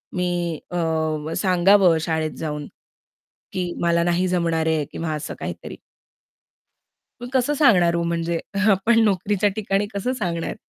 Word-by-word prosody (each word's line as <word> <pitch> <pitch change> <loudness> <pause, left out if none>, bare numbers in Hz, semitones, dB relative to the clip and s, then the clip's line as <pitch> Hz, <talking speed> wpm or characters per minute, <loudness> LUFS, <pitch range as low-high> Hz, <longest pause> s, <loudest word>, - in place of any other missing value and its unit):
मी 175 -2 -1
अ, 175 - -2 0.5
व 160 - -4
सांगावं 185 -2 +4
शाळेत 160 -1 -1
जाऊन, 150 -2 -4 0.9
की 180 -2 -2
मला 170 0 +2
नाही 175 +2 +1
जमणार 165 -3 0
आहे 155 -2 +1
किंवा 160 -2 -3
असं 150 - -5
काहीतरी. - - -7 1.5
मग 245 - -5
कसं 265 +3 +1
सांगणार 185 - +4
हो 170 - 0
म्हणजे 170 0 -1 0.3
आपण 225 +4 +3
नोकरीच्या 205 +1 +1
ठिकाणी 200 -1 0
कसं 225 +6 -1
सांगणार? 175 -8 -3
175 Hz, 135 wpm, -22 LUFS, 165-195 Hz, 1.5 s, सांगावं